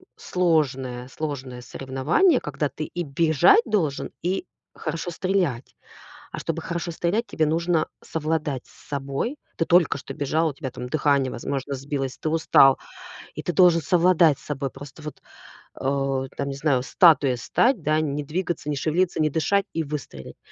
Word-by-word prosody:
сложное 135 -8 0
сложное 130 -4 -5
соревнование, 135 - +1
когда 145 0 -3
ты 150 +3 -5
и 175 0 -4
бежать 160 +6 +4
должен, 175 - -1
и 185 +1 -1 0.3
хорошо 165 +2 -4
стрелять. 175 -9 -1 0.6
А - - -5
чтобы - - -3
хорошо 170 0 -4
стрелять, 175 +8 -1
тебе 160 -9 0
нужно 165 +1 +1
совладать 155 -4 -2
с - - -20
собой. 140 - -3 0.2
Ты 165 - 0
только 175 -4 +4
что 135 0 -8
бежал, 155 +3 0
у - - -6
тебя 135 -3 -6
там 125 0 -7
дыхание, 140 -3 +2
возможно, 140 +3 -4
сбилось, 135 -1 -4
ты 155 - -2
устал, 145 -4 +5 0.6
и - - -6
ты 175 - -2
должен 175 -3 +5
совладать 170 -3 +4
с - - -18
собой. 140 -2 -3
Просто 145 +4 -12
вот, 150 - -8 0.5
э, 135 -1 -1
там, 140 - -2
не 140 - -4
знаю, 135 -3 +1
статуей 145 -5 +4
стать, 240 - +1
да, 155 +1 +1
не 145 -1 -2
двигаться, 165 0 -3
не 150 - 0
шевелиться, 170 +5 0
не 155 - +3
дышать 195 +7 +1
и 165 - -1
выстрелить. 140 - -7
150 Hz, 160 wpm, -24 LUFS, 135-170 Hz, 0.6 s, устал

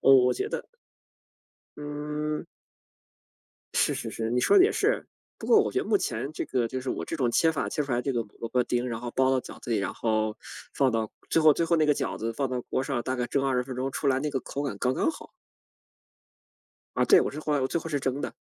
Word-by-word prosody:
我 135 - +6
我 125 - +3
觉 - - -2
得 - - -4 1.1
嗯。 150 +1 -4 1.3
是 - - +3
是 - - -4
是， 115 0 -3
你 125 +1 +2
说 395 - +5
得 365 - +8
也 420 - +3
是。 435 +5 +1 0.3
不 - - -7
过 445 - +6
我 - - -1
觉 - - +1
得 - - -4
目 410 - +2
前 140 - -3
这 - - -3
个 120 -3 0
就 130 +2 -4
是 130 - -6
我 - - -2
这 165 - -4
种 130 -5 +1
切 160 +7 +4
法 160 - -2
切 150 - -1
出 140 - -7
来 120 -1 +1
这 135 +2 -1
个 120 -1 0 0.2
萝 115 - -4
卜 125 +1 +2
丁， 120 +1 -1
然 115 -2 -4
后 120 0 -5
包 130 +1 +2
到 130 -1 +2
饺 - - -11
子 120 - -7
里， 115 - +2
然 100 - -2
后 110 -1 0 0.4
放 135 -3 +2
到 110 -1 -1 0.2
最 165 - +4
后 155 -1 +8
最 165 - 0
后 170 - +2
那 155 - +3
个 150 - +5
饺 - - -2
子 115 +1 -3
放 135 +3 -1
到 125 -1 -2
锅 - - -2
上， 135 -3 -2
大 130 +2 -2
概 125 -1 -1
蒸 135 +3 0
20 130 -2 +1
分 130 0 -6
钟 130 +2 -2
出 140 - -3
来 135 -1 +3
那 150 - -1
个 135 - -1
口 140 +3 -5
感 140 -8 -3
刚 125 +3 +1
刚 320 - +1
好。 - - -11 1.7
啊， - - +3
对， 400 - +7
我 - - 0
是 150 - -6
后 155 - -1
来 145 - +1
我 130 - +1
最 170 - -1
后 165 - -6
是 145 -3 0
蒸 135 +1 -2
的。 - - -4
135 Hz, 280 characters per minute, -27 LUFS, 125-150 Hz, 1.7 s, 得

